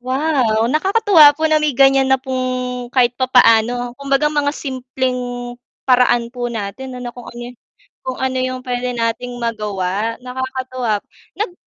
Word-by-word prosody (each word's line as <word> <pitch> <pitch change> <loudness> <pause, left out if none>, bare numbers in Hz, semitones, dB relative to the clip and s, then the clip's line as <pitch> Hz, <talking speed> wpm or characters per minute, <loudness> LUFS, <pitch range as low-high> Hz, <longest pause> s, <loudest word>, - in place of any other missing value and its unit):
Wow! 255 -4 +1
Nakakatuwa 365 -4 +5
po 315 - -2
na 310 0 +3
may 300 -3 0
ganyan 270 -1 +5
na 265 - +4
pong 255 -1 -3
kahit 245 -2 +4
papaano, 245 -1 +3
kumbaga 280 +1 +1
mga 290 -1 +1
simpleng 250 -2 -4 0.3
paraan 245 -2 +3
po 245 -1 -3
natin 235 +4 -6
ano, 245 -1 -6
kung 245 -1 -11
ano 240 +1 -8 0.5
kung 260 -1 -5
ano 260 0 -1
yung 255 0 -3
pwede 250 0 -2
nating 235 +1 -2
magawa 210 -2 -2
nakakatuwa. 255 -3 -3 0.4
Nag 415 -3 -2
250 Hz, 140 wpm, -18 LUFS, 240-265 Hz, 0.5 s, Nakakatuwa